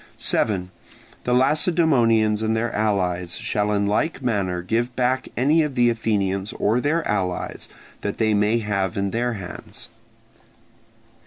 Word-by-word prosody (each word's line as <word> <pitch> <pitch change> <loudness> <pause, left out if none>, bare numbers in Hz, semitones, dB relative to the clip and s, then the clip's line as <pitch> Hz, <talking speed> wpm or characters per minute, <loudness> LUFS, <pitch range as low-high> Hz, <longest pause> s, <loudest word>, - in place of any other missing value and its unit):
7. 90 -4 0 0.5
The 125 - +1
Lacedaemonians 130 - +3
and 110 0 0
their 115 +1 -1
allies 90 -5 0
shall 105 0 -1
in 100 -1 +1
like 135 +9 0
manner 95 -7 -1
give 120 +5 -1
back 130 +1 0
any 145 +6 +3
of 150 -4 -2
the 120 -1 +4
Athenians 100 -3 -1
or 110 +4 +1
their 155 +4 0
allies 95 -3 -2 0.3
that 100 - -3
they 110 -1 +2
may 105 +2 +2
have 100 -4 -2
in 100 0 -1
their 120 +1 -1
hands. 95 -5 -8
110 Hz, 140 wpm, -23 LUFS, 100-125 Hz, 0.5 s, the